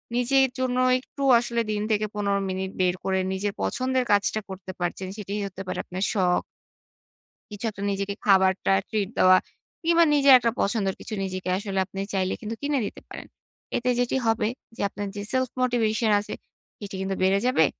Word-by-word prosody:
নিজের 265 +2 +3
জন্য 255 -1 0 0.2
একটু 275 +2 -8 0.2
আসলে 235 0 -1
দিন 210 -1 -1
থেকে 215 0 +2
১৫ 200 -1 0
মিনিট 190 0 -3
বের 180 -1 +2
করে, 190 0 0
নিজের 200 +1 -2
পছন্দের 255 +1 0
কাজটা 205 +1 +2
করতে 190 0 -7
পারছেন। 175 +2 -3
সেটিই 205 0 -4
হতে 190 0 -9
পারে - - -3
আপনার 185 +2 -4
শখ। 180 -3 +2 1.1
কিছু 205 +2 -6
একটা 200 - -10
নিজেকে 200 0 -2
খাবারটা 190 -1 +4 0.2
ট্রিট 205 -3 -1
দেওয়া 185 0 +7 0.5
কিংবা 335 +1 +5
নিজের 280 -2 +6
একটা 235 -1 +1
পছন্দের 195 -2 0
কিছু - - -7
নিজেকে 185 -1 -4
আসলে 195 -1 -2
আপনি 195 +1 -8
চাইলে 190 -1 0
কিন্তু 225 0 -4
কিনে 285 -1 0
দিতে - - -7
পারেন। - - -9 0.5
এতে 245 +1 -1
যেটি 245 +1 +1
হবে, 225 -1 +2 0.3
যে - - -6
আপনার 205 +1 -5
যে 205 - -4
সেলফ 260 -1 +1
মোটিভেশন 225 -3 +1
আছে, 205 - -6 0.5
এটি 200 -1 -6
কিন্তু 190 0 -2
বেড়ে 190 +1 +3
যাবে। 255 - +4
205 Hz, 175 wpm, -25 LUFS, 190-240 Hz, 1.1 s, দেওয়া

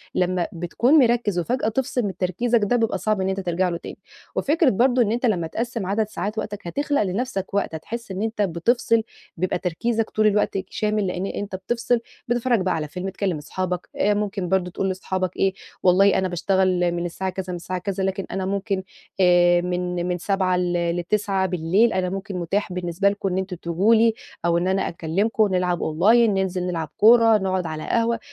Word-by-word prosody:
لمّا 180 -1 +1
بتكون 175 - +1
مِركِّز 235 -7 +2
وفجأة 240 +6 -1
تفصل 250 +2 -1
من 195 - -4
تركيزك 225 +7 +1
ده 205 +4 +2
بيبقى 225 -2 +1
صعب 215 -2 0
إن 190 - 0
أنت 190 0 -2
ترجع 180 0 0
له 170 - -2
تاني، - - -9 0.4
وفكرة 305 0 +3
برضه 250 +3 +3
إن 215 -3 +2
أنت 240 +3 0
لمّا 180 -8 +1
تقسِّم 230 +3 -3
عدد 205 +3 0
ساعات 215 0 -4
وقتك، 205 -4 -5
هتخلق 285 +8 0
لنفسك 195 0 -3
وقت 200 -5 -1
هتحس 230 +7 -6
إن 190 +1 -4
أنت 220 -1 -2
بتفصل 225 +5 +1 0.3
بيبقى 185 +2 0
تركيزك 220 +6 -1
طول 215 0 +2
الوقت 210 -1 +1
شامل 210 -2 -1
لأن 180 +1 -2
أنت 200 0 -4
بتفْصِل 235 +5 0 0.3
بتتفرّج 240 -2 +1
بقى 185 - 0
على 155 -2 -3
فيلم 180 +5 -5
تكلّم 190 -3 -2
اصحابك 180 +4 -4
آآ، 210 - +2
ممكن 205 -3 -2
برضه 185 -2 +1
تقول 190 +2 -1
لصحابك 185 -1 -3
إيه، 195 -1 +2 0.3
والله 190 +2 +5
أنا 190 0 +1
باشتغل 180 0 +1
من 170 0 -2
الساعة 190 +2 -3
كذا 190 0 -5
من - - -3
الساعة 180 +1 -4
كذا، 195 +1 -3
لكن 190 0 -2
أنا 190 -1 -2
ممكن 195 0 -2 0.4
آآ، 175 -1 +5
من 180 0 -2
من 180 0 -1
19:00 185 0 0
ل 175 -1 0
ل21:00 190 +1 +1
أنا 185 -1 0
ممكن 195 +1 -5
متاح 180 +2 -2
بالنسبة 180 +2 0
لكم 200 -1 -2
إن 185 - -2
أنتوا 190 -1 -3
تيجوا 185 +7 +3
لي 225 0 +4 0.3
أو 170 0 +3
إن 175 +2 0
أنا 190 +1 +1
أكلمكم 200 +7 0
نلعب 180 -1 0
Online 215 +9 +4
ننزل 190 -2 -1
نلعب 165 -4 -3
كورة، 225 0 +6
نقعد 190 -2 -1
على 155 -1 -5
قهوة، 230 0 +1
190 Hz, 190 wpm, -23 LUFS, 180-215 Hz, 0.4 s, كورة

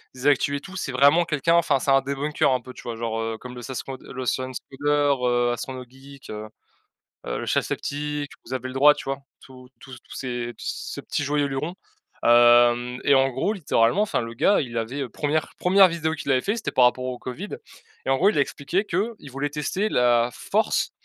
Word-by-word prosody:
des 130 +2 -2
actus 140 0 +3
et 140 - -4
tout, 190 0 -9
c'est 135 -8 -4
vraiment 145 +6 +5
quelqu'un, 165 +1 +1
enfin 150 -5 +3
c'est 135 - 0
un 135 0 +5
debunker 140 +3 0
un 125 - 0
peu, 130 +1 -11
tu - - -12
vois? 115 -1 -5
Genre, 115 -1 -3
heu, 115 0 -3
comme 125 +2 -10
le 125 - -8
Scens 130 +1 -5 0.2
le 130 -1 -7
ScienCoder, 140 +3 0
heu, 120 0 +2
Astronogeek, 130 +2 -8
heu 110 0 -6 0.8
heu, - - -3
le - - -4
Chef - - +1
Sceptique, 145 0 -3
Vous 125 - -7
avez 130 0 -3
le 130 - -7
droit, 145 +2 +7
tu 145 - -9
vois? 135 0 -2 0.2
Tous 130 -1 -15
tous 130 -3 -11
tous - - -12
ces 120 -2 -4
ces - - -5
Petit 145 - -3
Joyeux 145 0 +1
Luron, 140 +6 -3 0.5
hem 120 +1 +5
et 140 - +5
en 135 0 +4
gros, 135 - -1
littéralement, 155 - +2
enfin 210 - 0
le 115 0 -6
gars, 200 - +3
il 120 -3 -5
avait, 115 +5 -3
heu, 130 - -4
premièr 155 +1 -1
première 190 +1 +6
vidéo 160 -2 -2
qu'il 145 -3 -3
avait 130 - +3
fait, 205 - -1
c'était 225 - -3
par 125 - +4
rapport 125 +1 +1
au 125 -1 -3
Covid 125 -1 -7 0.6
et - - -2
en 135 - +3
gros, 195 +4 +4
il 215 - -1
a - - +5
expliqué 155 +8 -1
qu'il 200 - -3
voulait 140 +2 -2
tester 155 +8 -2
la 120 - +3
force - - 0
135 Hz, 215 wpm, -24 LUFS, 125-150 Hz, 0.8 s, droit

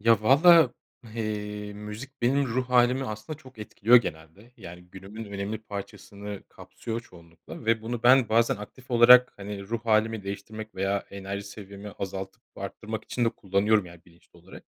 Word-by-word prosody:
Ya, 115 -1 +4
valla, 155 +3 +6 0.4
eee, 105 -2 -4
müzik 105 +7 -9
benim 135 +3 +2
ruh 125 +1 -2
hâlimi 125 +2 +3
aslında 110 +5 -6
çok 130 -6 -16
etkiliyor 110 +2 +4
genelde. 95 +2 -3
Yani, 90 -5 -11
günümün 100 +4 -9
önemli 100 +1 -4
parçasını 100 -1 -8
kapsıyor 115 0 -7
çoğunlukla 85 -1 -14
ve 115 0 +1
bunu 115 +1 -4
ben 125 -1 +6
bazen 115 +1 +3
aktif 125 +6 -12
olarak, 125 +1 +7
hani, 100 0 -7
ruh 110 +3 -4
hâlimi 110 0 +2
değiştirmek 105 +2 -7
veya 95 +1 -1
enerji 100 0 -6
seviyemi 100 0 -10
azaltıp 95 -1 -6
arttırmak 110 0 -6
için 120 - -1
de - - +3
kullanıyorum 100 0 +1
yani, 85 -1 -14
bilinçli 85 0 -22
olarak. 90 +3 -14
105 Hz, 155 wpm, -27 LUFS, 100-120 Hz, 0.4 s, olarak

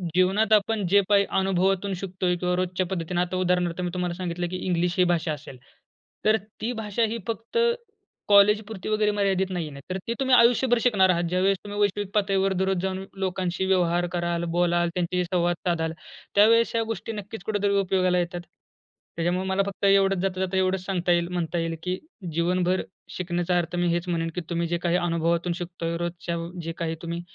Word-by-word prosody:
जीवनात 200 +4 +3
आपण 210 -1 +2
जे 200 +3 +5
काही 200 -1 +5
अनुभवातून 190 +1 +1
शिकतोय 185 -1 -1
किंवा 180 0 -1
रोजच्या 185 0 -1
पद्धतीने 175 -1 -2
आता 180 +1 -2
उदाहरणार्थ 180 -1 0
मी 175 - -1
तुम्हाला 180 -1 -2
सांगितलं 175 -1 -3
की 185 - -4
इंग्लिश 175 0 0
ही 180 - +5
भाषा 160 -2 -1
असेल. 140 -3 -10 0.7
तर 215 +1 +5 0.3
ती 235 +3 -1
भाषा 210 +2 -1
ही 230 - -3
फक्त 230 - -4 0.7
कॉलेजपुरती 210 0 +3
वगैरे 215 -1 +2
मर्यादित 195 -2 +1
नाहीये 165 -4 -3
ना. 140 - -10
तर 185 - -2
ती 230 - 0
तुम्ही 260 -1 +4
आयुष्यभर 245 +1 +4
शिकणार 200 -6 +4
आहात. 175 -1 +2
ज्यावेळेस 190 +2 +2
तुम्ही 205 0 -6
वैश्विक 205 -1 0
पातळीवर 195 -2 +2
दररोज 190 0 0
जाऊन 190 0 -2 0.2
लोकांशी 185 -1 -1
व्यवहार 175 -2 +2
कराल, 175 -1 -1
बोलाल, 175 -1 +2
त्यांच्याशी 180 0 0
संवाद 175 0 +2
साधाल 160 -2 0 0.4
त्यावेळेस 230 +3 +5
ह्या 225 - +2
गोष्टी 225 0 -4
नक्कीच 205 -2 -7
कुठेतरी 205 -1 0
उपयोगाला 185 -1 +2
येतात. 175 0 -3 0.7
त्याच्यामुळे 175 +3 0
मला 190 +1 +1
फक्त 200 0 -3
एवढच 195 -1 +4
जाता-जाता 190 0 -1
एवढच 185 0 +1
सांगता 180 -2 0
येईल, 170 0 +2
म्हणता 175 -1 -2
येईल 165 0 -2
की 185 0 -1 0.4
जीवनभर 180 +2 +1 0.3
शिकण्याचा 175 0 -1
अर्थ 175 0 -2
मी 175 0 +1
हेच 170 +1 0
म्हणेन, 165 -1 -1
की 180 - -2
तुम्ही 170 0 -1
जे 170 +1 -1
काही 175 0 0
अनुभवातून 170 0 0
शिकतोय, 170 -1 -4
रोजच्या 175 0 -3 0.3
जे 165 - -3
काही 165 -2 -2
तुम्ही 170 0 -4
185 Hz, 180 wpm, -25 LUFS, 175-195 Hz, 0.7 s, जे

